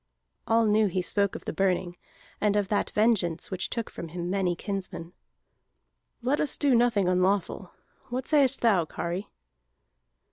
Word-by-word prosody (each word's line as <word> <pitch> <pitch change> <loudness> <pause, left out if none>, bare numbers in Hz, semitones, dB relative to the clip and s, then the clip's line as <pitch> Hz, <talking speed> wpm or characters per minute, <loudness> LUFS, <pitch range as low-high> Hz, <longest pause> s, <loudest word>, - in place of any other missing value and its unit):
All 225 0 +3
knew 215 0 +3
he 185 -1 -1
spoke 200 +1 +1
of - - -8
the - - -3
Burning, 185 -2 0 0.5
and 210 -1 +2
of 205 -2 0
that 205 - 0
vengeance 205 -7 +1
which 185 -1 -2
took 230 -2 -3
from 170 - -8
him 175 +2 -5
many 185 -3 0
kinsmen. 185 -3 -5 1.1
"Let 270 +4 +1
us 295 - 0
do 285 -3 +2
nothing 235 -5 +3
unlawful. 185 0 0 0.4
What 250 +1 -4
sayest 275 -3 +3
thou, 200 -8 +3
Kari?" 175 +5 -4
200 Hz, 150 wpm, -27 LUFS, 180-230 Hz, 1.1 s, All